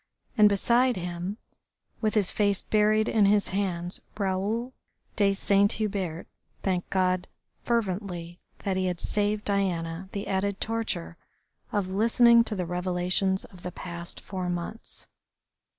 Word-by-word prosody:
And 210 -3 +7
beside 240 +5 +3
him, 180 +3 -4 0.6
with 215 -1 +1
his 205 -4 +3
face 200 -2 +1
buried 215 +1 +3
in 210 -3 +4
his 205 0 +4
hands, 180 -3 -2 0.2
Raoul 205 +5 -1 0.4
de 200 -2 +3
Saint 200 +1 +3
Hubert 195 -6 -2 0.4
thanked 185 -2 -1
God 185 -1 +1 0.4
fervently 185 -6 -2 0.2
that 190 -2 0
he 185 0 +1
had 180 -2 -2
saved 210 0 0
Diana 185 -3 -1
the 200 - -4
added 200 +1 -1
torture 220 - -2 0.5
of 200 -3 -1
listening 235 +4 +5
to 215 - -2
the 180 -2 -2
revelations 180 +2 0
of 185 -3 -15
the 180 - -5
past 170 -1 -6
four 185 -2 -4
months. 175 +6 -6
195 Hz, 135 wpm, -27 LUFS, 180-210 Hz, 0.6 s, And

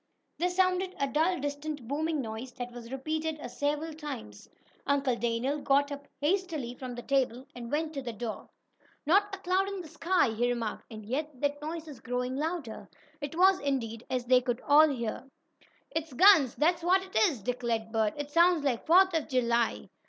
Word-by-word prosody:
There 355 +2 +2
sounded 370 0 +1
a 280 - +2
dull 320 +6 +1
distant 290 -2 -4
booming 305 +2 -1
noise, 230 +2 -6
that 245 -1 -6
was 240 0 -10
repeated 310 +3 -2
several 295 +4 -2
times. 200 - -8 0.4
Uncle 275 -3 +2
Daniel 235 +5 -1
got 285 +1 +2
up 285 0 -7
hastily 310 -5 -1
from 250 -1 -7
the 240 - -7
table 260 -2 0
and 235 -1 -8
went 310 +1 -1
to 275 - -4
the 245 -2 -5
door. 225 0 -6 0.6
"Not 395 +5 +3
a - - -12
cloud 380 +1 +1
in 395 -1 -5
the 340 - -10
sky," 330 -1 +1
he 235 +2 0
remarked, 230 -3 -3
"and 215 -2 -9
yet 285 +7 -2
that 290 0 0
noise 320 +1 -5
is 285 -6 -10
growing 250 +2 -2
louder." 305 -5 -4 0.3
It 290 +2 -5
was, 375 +1 +5
indeed, 235 -5 -2
as 255 -1 -1
they 250 0 +5
all 285 +5 +4
could - - -1
hear. 235 +2 -4 0.6
"It's 320 -3 -3
guns, 315 - +6
that's 340 +4 +2
what 370 +3 +3
it 380 - -14
is," 255 - -7
declared 235 -2 -2
Bert 220 -2 +1
"It 290 0 -5
sounds 340 -1 +4
like 255 -5 -1
Fourth 375 +3 +6
of 320 -2 0
July." 235 -2 +1
285 Hz, 185 wpm, -29 LUFS, 245-320 Hz, 0.6 s, guns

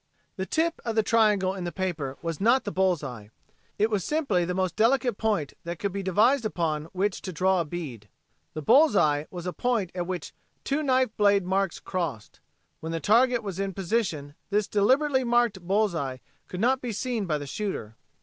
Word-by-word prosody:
The 190 -1 -4
tip 330 +1 0
of 230 -2 -3
the 220 - +3
triangle 210 -4 +3
in 190 -2 -5
the 175 - -3
paper 155 -8 -3
was 165 +1 -4
not 240 +5 +4
the 205 - -4
bull's 185 -5 +1
eye. 115 -7 -7 0.5
It 215 +2 +2
was 205 -4 0
simply 270 - 0
the 180 +1 -2
most 185 -1 -1
delicate 245 0 +2
point 205 -10 0
that 170 0 -5
could 200 +3 -2
be 200 +1 -3
devised 220 +8 +3
upon 160 -7 -1
which 190 +3 -2
to 185 - -5
draw 185 +2 +2
a - - -3
bead. 145 -11 -7 0.5
The 155 - -4
bull's 285 - +5
eye 150 -4 +2
was 175 -1 -7
a 180 - -3
point 230 -8 0
at 175 -1 -3
which 185 -1 -5 0.3
two 280 +2 0
knife 260 -5 +1
blade 200 -2 +4
marks 190 -1 0
crossed. 165 - -4 0.4
When 160 - -5
the 165 - -2
target 240 +5 +3
was 195 -3 -5
in 195 -2 -2
position 175 -8 -1 0.2
this 205 0 +1
delicately 260 +7 +2
marked 240 -5 +2
bull's 195 +3 +1
eye 135 -5 -3 0.3
could 180 - -6
not 260 +3 +2
be 240 -3 -3
seen 225 -2 -2
by 155 -3 0
the 145 - -6
shooter. 140 - -4
195 Hz, 200 wpm, -26 LUFS, 170-225 Hz, 0.5 s, bull's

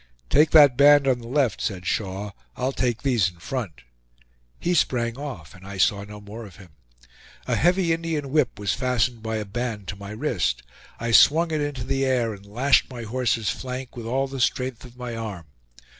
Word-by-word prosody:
"Take 150 +1 +5
that 145 -5 +7
band 145 0 +6
on 130 -2 +2
the 115 - -10
left," 130 -5 +1
said 90 -4 -3
Shaw; 100 0 -2 0.3
"I'll 130 +2 0
take 120 -4 -1
these 120 -9 +2
in 90 - -19
front." 85 - -5 0.8
He 175 - 0
sprang 120 -8 +1
off, 130 - -7
and 95 - -15
I 100 0 -8
saw 100 +2 +2
no 105 +1 -10
more 105 +3 -9
of 100 -6 -12
him. 95 -1 -15 0.8
A - - 0
heavy 175 +1 +3
Indian 160 -4 -3
whip 150 -5 +1
was 100 -1 -1
fastened 125 -2 0
by 110 0 -3
a 110 -1 -3
band 110 -2 -4
to - - -4
my 100 0 -9
wrist; 110 - -1 0.4
I 115 +1 -2
swung 160 +8 +6
it 155 -1 0
into 145 -4 -3
the 135 +2 -1
air 125 -4 +1
and 100 0 -13
lashed 125 +7 +3
my 120 -3 -7
horse's 115 -2 0
flank 130 0 -6
with 115 -2 -6
all 135 +3 0
the 135 0 -6
strength 125 -1 -1
of 125 0 -14
my 125 -2 -5
arm. 105 -7 -6
120 Hz, 200 wpm, -24 LUFS, 105-135 Hz, 0.8 s, that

